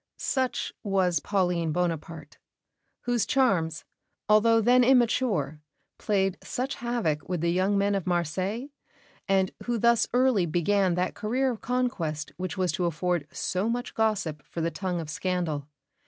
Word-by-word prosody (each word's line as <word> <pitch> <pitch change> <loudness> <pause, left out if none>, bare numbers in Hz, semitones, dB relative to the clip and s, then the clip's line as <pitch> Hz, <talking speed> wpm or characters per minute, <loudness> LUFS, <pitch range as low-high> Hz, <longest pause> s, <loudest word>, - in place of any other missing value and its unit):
'" - - -62 0.2
Such 260 -1 -1
was 190 -5 +1
Pauline 175 -2 0
Bonaparte, 165 -2 -3 0.6
whose 240 -2 0
charms, 180 - +1 0.4
although 225 +2 +5
then 245 +3 +5
immature, 230 - +2 0.4
played 195 -2 0
such 260 +2 -3
havoc 220 -12 -1
with 180 -3 -1
the 170 0 +1
young 190 +3 +2
men 200 +1 +2
of 195 -3 -2
Marseilles, 185 - -1 0.6
and 190 -1 +2
who 240 -1 0
thus 235 0 +3
early 245 -7 +3
began 180 +2 +2
that 180 +1 -1
career 255 +5 0
of 230 - -7
conquest 215 - -2
which 185 +2 -4
was 185 -1 +1
to 180 - -1
afford 170 -1 -1
so 190 +5 -1
much 245 +1 -3
gossip 200 -9 0
for - - -8
the 165 +1 0
tongue 180 +1 -3
of 160 - -5
scandal. 160 -3 -2
190 Hz, 150 wpm, -27 LUFS, 170-230 Hz, 0.6 s, although